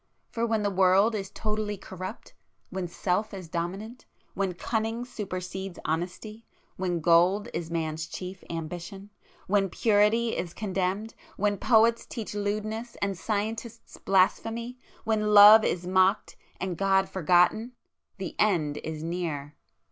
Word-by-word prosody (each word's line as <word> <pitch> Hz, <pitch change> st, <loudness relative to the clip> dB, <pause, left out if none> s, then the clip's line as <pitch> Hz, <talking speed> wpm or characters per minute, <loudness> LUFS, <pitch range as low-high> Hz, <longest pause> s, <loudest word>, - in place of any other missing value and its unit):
——for 230 Hz, 0 st, -1 dB
when 220 Hz, -2 st, 0 dB
the 205 Hz, -, 0 dB
world 190 Hz, +4 st, +4 dB
is 195 Hz, -3 st, -3 dB
totally 210 Hz, 0 st, -3 dB
corrupt,—when 185 Hz, -1 st, -8 dB
Self 195 Hz, +4 st, -1 dB
is 185 Hz, -3 st, -8 dB
dominant,—when 190 Hz, +1 st, -5 dB
cunning 225 Hz, +4 st, -2 dB
supersedes 190 Hz, -4 st, -6 dB
honesty,—when 180 Hz, +1 st, -4 dB
gold 180 Hz, +6 st, +4 dB
is 165 Hz, -1 st, -4 dB
man's 160 Hz, -1 st, -3 dB
chief 185 Hz, +2 st, -7 dB
ambition,—when 195 Hz, +4 st, -4 dB
purity 220 Hz, +3 st, +2 dB
is 170 Hz, -1 st, -4 dB
condemned,—when 205 Hz, +1 st, -2 dB
poets 230 Hz, -1 st, +3 dB
teach 225 Hz, -4 st, -6 dB
lewdness, 215 Hz, +3 st, -3 dB
and 200 Hz, -1 st, -1 dB
scientists 220 Hz, +4 st, -4 dB
blasphemy,—when 220 Hz, +2 st, 0 dB
love 210 Hz, +2 st, +10 dB
is 175 Hz, 0 st, -1 dB
mocked, 185 Hz, +3 st, +2 dB, 0.2 s
and 180 Hz, -2 st, -3 dB
God 195 Hz, -1 st, +3 dB
forgotten,—the 190 Hz, +3 st, 0 dB
End 160 Hz, -8 st, +2 dB
is 155 Hz, 0 st, -6 dB
near! 160 Hz, -4 st, -4 dB
195 Hz, 110 wpm, -27 LUFS, 180-215 Hz, 0.2 s, love